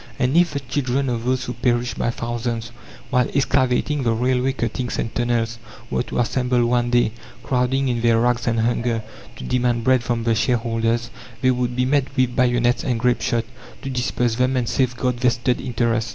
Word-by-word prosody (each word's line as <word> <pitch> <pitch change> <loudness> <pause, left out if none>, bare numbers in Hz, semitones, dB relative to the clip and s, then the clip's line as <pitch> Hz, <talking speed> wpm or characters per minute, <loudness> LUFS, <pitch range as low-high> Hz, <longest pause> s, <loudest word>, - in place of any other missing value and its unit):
And 130 +2 +1
if 170 -1 +4
the 140 - -1
children 135 0 -1
of 120 -1 -2
those 130 0 0
who 125 - -4
perished 120 -1 0
by - - +1
thousands 115 0 -3 0.4
while 125 -1 +3
excavating 135 +1 +1
the 115 -3 +1
railway 125 +3 +1
cuttings 120 -1 -3
and 115 - -3
tunnels 115 -1 -1 0.3
were - - +1
to - - -5
assemble 120 +1 +1
one 120 0 +1
day, 120 -2 +3 0.3
crowding 130 +1 +1
in 120 -2 0
their 115 -1 +4
rags 120 0 +1
and 115 -1 +1
hunger, 115 -1 0 0.3
to - - -9
demand 120 - 0
bread 130 0 +3
from 120 -1 -1
the 115 0 +2
shareholders, 115 0 0 0.3
they 130 - +5
would 125 -1 -1
be 125 0 +1
met 135 0 +2
with 125 -1 +2
bayonets 120 -1 +2
and 125 -4 -1
grapeshot, 120 -1 +1 0.4
to 135 - -4
disperse 125 -2 -1
them 130 +1 +1
and 120 -2 0
safeguard 125 -1 0
"vested 125 0 +1
interests." 115 -2 0
120 Hz, 180 wpm, -22 LUFS, 115-130 Hz, 0.4 s, they